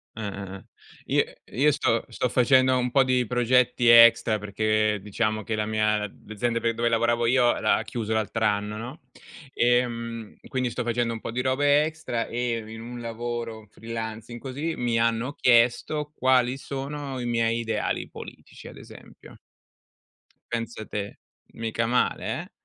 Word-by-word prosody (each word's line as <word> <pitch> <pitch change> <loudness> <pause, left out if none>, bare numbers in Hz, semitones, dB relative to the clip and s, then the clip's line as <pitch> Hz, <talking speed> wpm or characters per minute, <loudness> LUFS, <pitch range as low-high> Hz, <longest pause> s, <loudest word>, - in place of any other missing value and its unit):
Eh, 110 - -6
eh, 100 -1 -6
eh. - - -16 0.4
I - - +2 0.4
io 150 0 +6
sto 115 -5 +1
sto - - -1
facendo 130 +1 +4
un 125 -1 -1
po' 135 +1 +5
di 125 -1 +2
progetti 125 +1 +2
extra 115 -1 +7
perché 105 +1 0
diciamo 110 +1 -1
che 110 - -2
la 105 - -1
mia 105 0 +1 0.3
l'azienda 115 +2 -1
pe 115 0 0
dove 115 +1 0
lavoravo 115 +1 +1
io 120 0 +3
l'ha 110 0 +3
chiuso 110 -2 -4
l'altr'anno, 105 -1 0
no, 120 +7 -7 0.5
ehm, 115 -2 0
quindi 130 -2 -1
sto 125 +1 -3
facendo 120 0 0
un 115 - -7
po' - - -5
di 125 - -1
robe 145 +3 +3
extra 155 -7 -3
e 120 -1 -1
in 110 0 -8
un 120 +1 -8
lavoro 115 -1 -5
freelancing 115 +1 -6
così 145 +5 -4
mi 120 -2 0
hanno 115 +3 +1
chiesto 125 +5 +2
quali 130 -1 +2
sono 140 0 -5
i 120 - -4
miei 115 -1 +1
ideali 110 -2 -2
politici, - - -11
ad - - -11
esempio. - - -14 1.1
Pensa 115 -2 -4
te, 100 -1 -6 0.3
mica 115 0 -2
male 125 +2 0 0.2
eh? - - -13
115 Hz, 155 wpm, -25 LUFS, 110-125 Hz, 1.1 s, extra